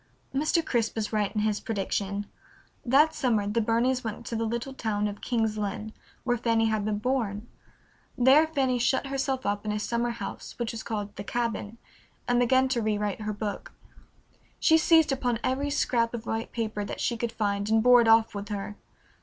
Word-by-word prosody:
Mr. 310 +4 +1
Crisp 230 -3 0
was 220 -1 -3
right 210 -2 +1
in 210 - +1
his 210 -1 0
prediction. 200 -1 -2 0.6
That 290 +5 +4
summer 225 -8 +1
the 210 +3 0
Burneys 240 +4 +1
went 225 +1 -5
to 230 - -4
the 225 0 -1
little 235 +4 -3
town 210 -4 -1
of 205 0 -7
King's 220 -3 0
Lynn, 210 +1 -4 0.3
where 245 -1 +1
Fanny 230 -1 +2
had 215 -2 0
been 210 -1 0
born. 220 -2 -2 0.7
There 270 +6 +6
Fanny 265 -5 0
shut 260 +3 +1
herself 270 -1 -2
up 205 0 -1
in 210 - -2
a 210 - -1
summer 235 +3 -1
house 230 -4 -7
which 235 -1 -2
was 230 -2 -6
called 205 -2 -4
"The - - -5
Cabin," 230 -1 -3 0.5
and 245 0 +3
began 260 +2 +4
to 245 -3 0
rewrite 210 -1 -1
her 215 0 -2
book. 205 0 -5 0.9
She 320 0 +5
seized 320 -2 +5
upon 250 -3 0
every 275 +3 0
scrap 240 -5 +1
of 230 -1 -7
white 225 +1 -3
paper 220 -3 -3
that 200 - -6
she 235 - 0
could 235 0 -3
find 205 -2 -1
and 220 0 +3
bore 245 0 +7
it 230 - +1
off 225 0 +5
with 205 0 -6
her. 205 0 -5
230 Hz, 195 wpm, -27 LUFS, 210-250 Hz, 0.9 s, bore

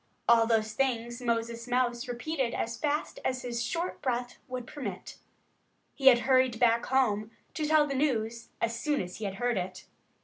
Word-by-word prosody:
All 230 -1 +6
those 220 -1 +1
things 240 -1 -1
Moses 235 0 -1
Mouse 245 -1 0
repeated 250 +1 -2
as 230 +1 -2
fast 295 +4 -2
as 255 0 -1
his 240 -1 -3
short 340 +8 -3
breath 245 -1 -2
would 255 -2 -5
permit. 245 -10 -7 0.8
He 270 - 0
had 240 -2 +8
hurried 255 -3 +3
back 235 -1 +3
home 220 -5 +2 0.2
to 305 -1 -2
tell 310 -1 +5
the 280 - -3
news 235 -5 -1
as 230 0 0
soon 295 0 0
as 180 -1 -5
he 220 - -5
had 195 -1 -3
heard 245 0 0
it. 185 +1 -4
240 Hz, 175 wpm, -29 LUFS, 230-265 Hz, 0.8 s, had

